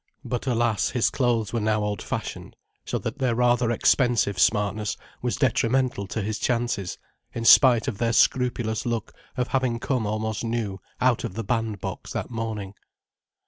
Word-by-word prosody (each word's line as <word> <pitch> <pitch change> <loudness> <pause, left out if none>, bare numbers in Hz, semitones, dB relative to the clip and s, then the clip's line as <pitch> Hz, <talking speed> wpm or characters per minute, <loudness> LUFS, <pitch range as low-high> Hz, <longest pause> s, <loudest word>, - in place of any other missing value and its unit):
But 125 +2 -3
alas, 115 -3 +1
his 120 - +1
clothes 120 -5 0
were 115 - +1
now 105 0 +1
old 105 -2 -2
fashioned, - - -5 0.3
so - - -2
that 145 - -5
their 125 -3 +1
rather 120 0 +2
expensive 120 -4 +2
smartness 105 +1 +1 0.2
was 125 -1 -1
detrimental 125 -4 +1
to 110 +2 -3
his 110 +2 -3
chances, 115 -6 -1 0.4
in 115 - -3
spite 125 -1 +7
of 115 -7 -3
their 115 0 +1
scrupulous 120 -2 +2
look 115 -2 -3 0.2
of 125 -1 -1
having 130 -3 0
come 125 -4 -1
almost 110 +1 -2
new 115 -4 -3 0.2
out 125 -2 +2
of 95 - -5
the 115 - -3
bandbox 110 -3 -3
that - - -4
morning. 110 -4 -4
115 Hz, 160 wpm, -25 LUFS, 105-125 Hz, 0.4 s, spite